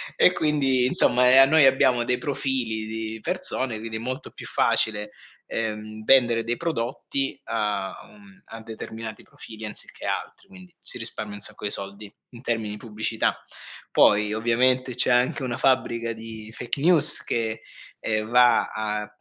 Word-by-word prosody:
e 180 - +5
quindi 135 -6 +1
insomma 125 -1 +5
e 130 - +6
a 135 - +9
noi 155 +1 +5
abbiamo 130 -2 +3
dei 125 0 +1
profili 130 -7 -2
di 110 0 -6
persone, 135 -11 +1
quindi 110 0 -6
è - - -6
molto 130 +3 -5
più - - -11
facile, 105 -1 0 0.4
ehm, 110 -1 -5
vendere 120 -4 +4
dei 120 +1 -2
prodotti 135 -2 -3
a 105 -4 -2
un 200 -2 -19
a 115 - -10
determinati 110 0 -8
profili 110 -1 -10
anziché 105 - -8
altri, - - -5
quindi 185 -3 -16
si - - +1
risparmia 110 -2 -5
un 105 - -10
sacco 105 +1 -2
di 100 - -1
soldi 100 +1 -6 0.2
in 120 0 -13
termini 110 -4 -3
pubblicità. 110 0 -2 0.5
Poi 105 0 +3
ovviamente 125 +2 +1
c'è 125 - +2
anche 125 +3 +1
una 120 -2 -3
fabbrica 115 -3 0
di 110 -1 -9
fake 125 +3 -4
news 165 -2 +5
che, 115 -1 -3 0.4
ehm, 110 0 -2
va 120 -1 +4
a 105 -1 -3
115 Hz, 155 wpm, -24 LUFS, 110-130 Hz, 0.5 s, a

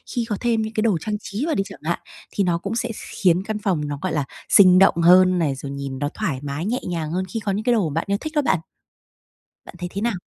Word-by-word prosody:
Khi 240 -2 0
có 205 - -1
thêm 230 -2 +1
những 220 0 -4
cái 215 - 0
đồ 215 -6 +2
trang 210 +3 -2
trí 210 +6 -4
vào 325 - 0
đi 195 - +1
chẳng 195 - -11
hạn, 170 +2 -1 0.3
thì 200 - 0
nó 175 -2 +1
cũng 200 +6 -4
sẽ 240 +1 -1 0.3
khiến 180 0 +4
căn 215 0 -3
phòng 175 -8 -1
nó, 145 -1 -4
gọi 185 - -2
là, 150 -3 0 0.2
sinh 185 -2 +7
động 195 - +6
hơn 185 +1 +6
này, 145 -5 0
rồi 140 +1 -7
nhìn 140 -1 -5
nó 145 - -1
thoải 165 -12 -2
mái, 145 +3 -4
nhẹ 240 +5 -1
nhàng 160 -3 -3
hơn 185 +2 -1
khi 230 - -3
có 205 -2 -2
những 205 +3 -2
cái 245 +1 +3
đồ 200 -8 +1
bạn 160 +3 -1
yêu 200 0 +1
thích 310 0 -5
đó 295 - +4
bạn. 190 - +1 1.1
Bạn - - -11
thấy 175 0 -4
thế 200 - -3
nào? 230 -2 0
190 Hz, 280 wpm, -22 LUFS, 165-215 Hz, 1.1 s, sinh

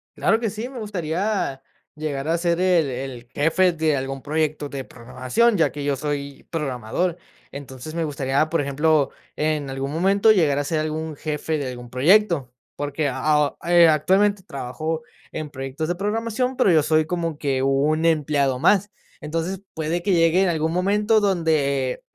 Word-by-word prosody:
Claro 225 - +2
que 230 -2 -1
sí. 220 +4 -5
Me 260 -1 -8
gustaría 185 -6 -2 0.3
llegar 150 -2 -4
a 165 +1 +2
ser 170 0 0
el 180 -5 +3
el 125 -2 -6
jefe 165 +5 +3
de 160 -2 +1
algún 135 0 -4
proyecto 150 0 -1
de 135 -1 -5
programación, 130 - 0
ya 165 - +2
que 145 - -6
yo 140 0 0
soy 140 0 -4
programador. 150 +3 -2 0.3
Entonces, 140 +1 -8
me 170 - 0
gustaría, 140 0 0
por 165 -1 +1
ejemplo, 145 +1 +1 0.2
en 150 -2 -1
algún 135 +1 -4
momento 195 +7 +4
llegar 160 -9 +3
a - - 0
ser 155 +2 -1
algún 155 0 -3
jefe 155 +1 -3
de 140 -3 -3
algún 120 -1 -9
proyecto. 155 - +3 0.2
Porque 145 +1 -2
aho 145 +2 +1
eh, 170 -1 +6
actualmente, 190 +6 +2
trabajo 155 0 -4 0.3
en 155 -1 -5
proyectos 135 +3 -5
de 175 - -1
programación, 225 +6 -2
pero 250 -7 +4
yo 155 -3 +4
soy 155 +1 +2
como 165 -2 -3
que 135 -3 -1
un 145 +4 +2
empleado 145 -5 +1
más. 205 +7 +3 0.3
Entonces, 165 +5 -3
puede 160 +2 -2
que 195 +3 0
llegue 165 +1 +4
en 190 - +2
algún 160 -1 0
momento 205 +4 +2
donde, 155 -9 +1
eh - - -14
155 Hz, 170 wpm, -23 LUFS, 140-175 Hz, 0.3 s, eh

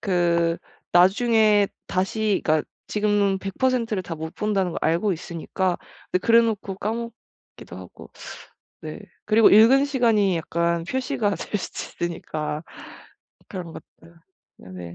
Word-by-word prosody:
그 170 -3 +1 0.4
나중에 210 +2 +4 0.2
다시 200 +2 0
그러니까 155 -1 +1 0.2
지금 205 -2 +1
100% 230 +4 -1
를 190 - -2
다 175 -2 -6
못 160 +1 -7
본다는 195 -4 -1
걸 - - -3
알고 175 +5 +1
있으니까. 175 +2 -3 0.3
근데 185 - -1
그래놓고 230 -4 +3
까먹기도 230 +2 -7
하고. - - -12 0.7
네. - - -8 0.2
그리고 220 0 +5
읽은 235 +7 +7
시간이 225 -9 +2
약간 170 +1 -1
표시가 240 -1 -1
될 210 - -4
수도 180 - -6
있으니까 155 -3 -4 0.9
그런 180 -4 -7
것들 170 - -15 0.4
네네. 90 -2 -10
195 Hz, 255 characters per minute, -23 LUFS, 170-220 Hz, 0.9 s, 읽은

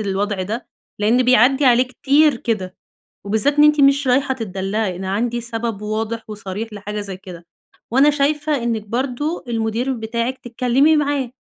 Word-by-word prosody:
الوضع 200 -1 -2
ده، 220 +6 -5 0.3
لإن 230 +5 +3
بيعدّي 255 +3 +4
عليه 250 0 +5
كتير 280 +3 +2
كده. 205 -6 -3 0.5
وبالذات 220 +8 +1
إن 295 - +6
أنتِ 300 -1 +5
مش 275 0 +4
رايحة 265 +2 +2
تتدلّعي، 195 -3 -3
أنا 190 +1 -4
عندي 240 +3 -1
سبب 225 -2 -4
واضح 220 +2 -3
وصريح 210 +1 -5
لحاجة 210 +1 -5
زي 195 -2 -7
كده. 180 -3 -11 0.5
وأنا 275 +3 +5
شايفة 295 -1 0
إنِّك 225 -3 -2
برضه 265 +7 -2
المُدير 230 +3 -1
بتاعِك 235 +2 -3
تتكلّمي 250 +6 +2
معاه. 285 -4 0
235 Hz, 150 wpm, -19 LUFS, 210-270 Hz, 0.5 s, إن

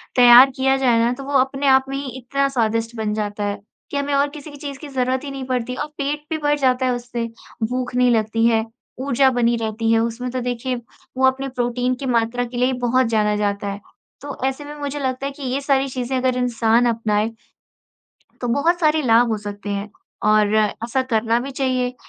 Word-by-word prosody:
तैयार 245 +2 +9
किया 265 0 +2
जाए 245 -4 +3
ना 235 - +2
तो 275 +2 -8
वो 285 +1 -6
अपने 270 +2 0
आप 265 0 +5
में 275 - -3
ही 280 - -4
इतना 275 +2 -1
स्वादिष्ट 230 -2 -1
बन 215 -1 -1
जाता 210 -1 -3
है, 205 0 -2 0.3
कि 285 - -2
हमें 280 0 -1
और 280 +1 +2
किसी 300 +1 -10
भी 290 - -11
चीज़ 285 -1 -7
की 300 - -8
ज़रूरत 260 0 -1
ही 280 - -6
नहीं 270 -1 -6
पड़ती 250 -1 -2
और 295 - -3
पेट 295 +1 -3
भी 320 - -1
भर 295 -1 +1
जाता 260 -1 +2
है 255 - +2
उससे। 240 -1 -4 0.4
भूख 250 0 -3
नहीं 250 -1 +4
लगती 225 0 +1
है, 225 -1 +2 0.3
ऊर्जा 265 0 +3
बनी 240 -1 +2
रहती 225 0 -1
है, 225 - +4
उसमें 235 +2 -2
तो 255 - -2
देखिए 245 0 -3 0.4
वो 265 - +3
अपने 265 +1 0
प्रोटीन 245 0 -1
की 270 - -7
मात्रा 240 0 +1
के 245 +1 -8
लिए 250 - +3
ही 260 - 0
बहुत 250 +1 +2
जाना 210 -2 +1
जाता 205 -1 -1
है। 200 +1 -5 0.4
तो 285 -1 -7
ऐसे 270 +2 -2
में 295 +1 -8
मुझे 285 0 -4
लगता 260 0 -2
है 280 - -2
कि 280 0 -11
ये 260 +1 -1
सारी 275 -1 +1
चीज़ें 255 0 -3
अगर 255 0 +1
इंसान 240 -1 +2
अपनाए, 220 -2 0 1.1
तो 245 - -2
बहुत 325 +8 +2
सारे 310 -1 +3
लाभ 235 -1 +4
हो 220 - +1
सकते 205 0 -7
हैं 200 +1 -3 0.4
और 215 0 +3
ऐसा 230 +4 0
करना 230 -2 +1
भी 270 +3 -5
चाहिए, 255 -2 -1
250 Hz, 220 wpm, -21 LUFS, 230-270 Hz, 1.1 s, तैयार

